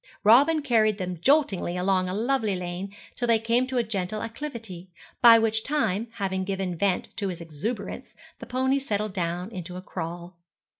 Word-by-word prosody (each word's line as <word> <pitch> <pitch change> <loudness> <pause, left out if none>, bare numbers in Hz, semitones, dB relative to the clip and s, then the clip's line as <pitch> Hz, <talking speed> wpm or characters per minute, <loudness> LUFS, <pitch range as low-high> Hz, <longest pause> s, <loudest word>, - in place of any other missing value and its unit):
Robin 285 +9 +5
carried 220 -6 +3
them 180 -2 -3
joltingly 200 - +2
along 185 0 +1
a - - -3
lovely 225 -2 0
lane 180 +2 -5 0.2
till 240 - -2
they 230 -1 +5
came 230 +3 +1
to 260 -1 -3
a 240 - +3
gentle 210 -1 -3
acclivity, 225 -8 -7 0.3
by 235 -1 +9
which 220 -1 +1
time, 235 -8 0
having 190 -2 -2
given 190 -2 -2
vent 190 +1 0
to 200 - -2
his 180 -2 -4
exuberance, 170 +8 -5 0.2
the - - -9
pony 260 +2 +1
settled 215 -6 -2
down 180 +2 -3
into 180 -3 -7
a - - -6
crawl. 175 0 -7
205 Hz, 170 wpm, -26 LUFS, 180-235 Hz, 0.3 s, by